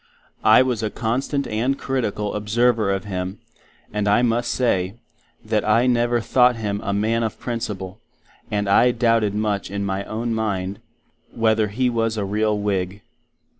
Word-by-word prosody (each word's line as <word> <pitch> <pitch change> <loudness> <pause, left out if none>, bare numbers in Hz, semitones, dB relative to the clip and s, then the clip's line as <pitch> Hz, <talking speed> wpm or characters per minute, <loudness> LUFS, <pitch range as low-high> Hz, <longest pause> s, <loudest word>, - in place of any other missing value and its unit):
I 110 +3 +7
was 125 -4 -1
a 110 - -1
constant 130 +6 -1
and 125 +6 -1
critical 110 -7 -2
observer 110 0 +1
of 95 -1 -1
him, 95 0 -4 0.6
and 105 -1 -1
I 105 +4 +4
must 120 0 +1
say, 95 -6 0 0.5
that 110 -1 0
I 115 +3 +3
never 120 -1 +2
thought 125 +2 +4
Him 105 -3 -3
a 100 - -2
man 110 +3 +1
of 110 -2 -3
Principle; 105 -5 -5 0.5
and 105 -1 -1
I 100 +5 +5
doubted 115 -4 +2
much 105 -3 -1
in 100 +1 -3
my 95 0 -2
own 115 +2 -3
mind, 100 -3 -2 0.6
wether 110 -1 +2
He 125 +5 0
was 115 -2 0
a 100 - -1
real 105 +1 0
Whig. 100 -1 -2
110 Hz, 160 wpm, -22 LUFS, 100-120 Hz, 0.6 s, I